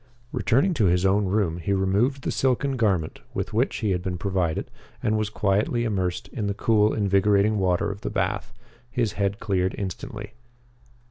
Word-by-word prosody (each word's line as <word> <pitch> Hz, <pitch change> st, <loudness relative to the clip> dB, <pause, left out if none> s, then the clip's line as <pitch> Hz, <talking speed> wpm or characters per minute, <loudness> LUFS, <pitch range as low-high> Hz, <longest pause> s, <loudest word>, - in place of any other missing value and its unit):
Returning 140 Hz, -, +2 dB
to 115 Hz, -10 st, +2 dB
his 90 Hz, +1 st, +3 dB
own 100 Hz, +2 st, +3 dB
room, 95 Hz, -4 st, 0 dB
he 100 Hz, +4 st, -1 dB
removed 100 Hz, +8 st, +1 dB
the -, -, -1 dB
silken 135 Hz, +1 st, +1 dB
garment 95 Hz, -10 st, 0 dB, 0.2 s
with 100 Hz, +2 st, -3 dB
which 120 Hz, +5 st, +1 dB
he 100 Hz, -, +2 dB
had 90 Hz, -1 st, 0 dB
been 90 Hz, -1 st, -3 dB
provided 90 Hz, -3 st, -1 dB, 0.3 s
and 110 Hz, -, +2 dB
was 110 Hz, -1 st, 0 dB
quietly 105 Hz, +3 st, +1 dB
immersed 95 Hz, -6 st, -1 dB
in 105 Hz, -5 st, -3 dB
the 100 Hz, -, -1 dB
cool, 105 Hz, -1 st, +3 dB
invigorating 100 Hz, +1 st, +2 dB
water 95 Hz, +2 st, +1 dB
of 100 Hz, -, -8 dB
the -, -, -3 dB
bath. -, -, -2 dB, 0.4 s
His 120 Hz, -3 st, 0 dB
head 100 Hz, +1 st, -1 dB
cleared 95 Hz, -3 st, 0 dB
instantly. 105 Hz, +2 st, -6 dB
100 Hz, 175 wpm, -25 LUFS, 95-110 Hz, 0.4 s, his